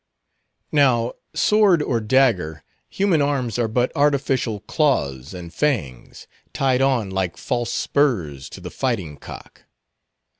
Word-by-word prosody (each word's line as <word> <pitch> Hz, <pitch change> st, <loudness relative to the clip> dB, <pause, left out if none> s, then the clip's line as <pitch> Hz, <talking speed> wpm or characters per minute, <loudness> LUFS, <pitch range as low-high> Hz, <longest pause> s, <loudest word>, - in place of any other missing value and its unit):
Now, 125 Hz, -5 st, +3 dB, 0.2 s
sword 205 Hz, -7 st, +4 dB
or 120 Hz, -5 st, 0 dB
dagger, 105 Hz, -, +1 dB, 0.3 s
human 190 Hz, -6 st, +1 dB
arms 130 Hz, -5 st, -1 dB
are 120 Hz, -, +1 dB
but 120 Hz, +3 st, 0 dB
artificial 135 Hz, -6 st, +1 dB
claws 70 Hz, -, 0 dB
and 85 Hz, -1 st, -9 dB
fangs, 100 Hz, -, -2 dB, 0.3 s
tied 130 Hz, -2 st, +1 dB
on 125 Hz, -7 st, +1 dB
like 95 Hz, -2 st, -2 dB
false 120 Hz, -1 st, -2 dB
spurs 90 Hz, -, 0 dB
to -, -, -10 dB
the -, -, -8 dB
fighting 100 Hz, -, -2 dB
cock. -, -, -12 dB
120 Hz, 120 wpm, -22 LUFS, 95-140 Hz, 0.3 s, sword